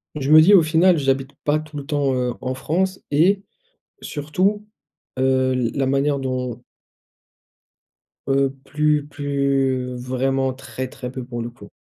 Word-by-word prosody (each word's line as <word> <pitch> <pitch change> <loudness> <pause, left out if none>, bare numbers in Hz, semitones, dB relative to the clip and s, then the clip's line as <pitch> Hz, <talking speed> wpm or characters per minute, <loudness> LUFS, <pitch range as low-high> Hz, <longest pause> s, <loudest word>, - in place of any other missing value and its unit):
Je 145 -1 -1
me 155 - +10
dis: 185 +6 +6
«Au 190 - +8
final, 165 +3 +4
j'habite 135 -1 0
pas 150 +1 +2
tout 155 -1 -11
le 140 - -6
temps, 145 -3 0
heu, 125 -1 -1
en 130 0 -3
France» 185 +8 -1
et, 185 +7 +3 0.6
surtout, 185 +8 -1 0.5
heu, 130 0 +2
l 125 -2 0
la 135 -2 0
manière 140 +1 +1
dont 125 -2 -3 1.7
Heu, 135 0 +2 0.2
plus 150 -1 +1
plus 140 -3 -1
vraiment 130 +1 0
très, 130 0 -6
très 125 0 -8
peu, 130 0 -6
pour 120 -1 -5
le 120 - -5
coup. 105 -4 -14
135 Hz, 150 wpm, -21 LUFS, 130-150 Hz, 1.7 s, me